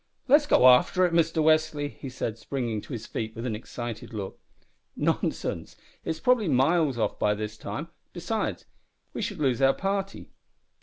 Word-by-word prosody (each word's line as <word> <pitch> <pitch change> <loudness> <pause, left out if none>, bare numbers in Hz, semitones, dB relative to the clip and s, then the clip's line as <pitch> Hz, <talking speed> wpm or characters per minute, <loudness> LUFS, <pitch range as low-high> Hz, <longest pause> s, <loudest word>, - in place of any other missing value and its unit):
"Let's 290 +2 +5
go 130 - +6
after 130 +9 +5
it, 175 - -1
Mister 165 -1 +2
Westly," 155 -2 +2
he 135 - -9
said, 115 -3 -4
springing 115 -4 -3
to 140 - -9
his 115 -2 -5
feet 110 -1 -5
with 115 +1 -5
an 115 -4 -2
excited 115 0 -7
look. 100 -2 -6 0.6
"Nonsense, - - -2 0.3
it - - -5
is 160 - -2
probably 245 -3 +3
miles 140 0 +2
off 110 - -1
by 105 0 +2
this 105 0 -5
time; 150 +8 -6 0.2
besides, 185 +6 -3 0.5
we - - -4
should - - -3
lose 135 -4 +1
our 135 0 +5
party." 195 0 -3
140 Hz, 170 wpm, -27 LUFS, 115-170 Hz, 0.6 s, go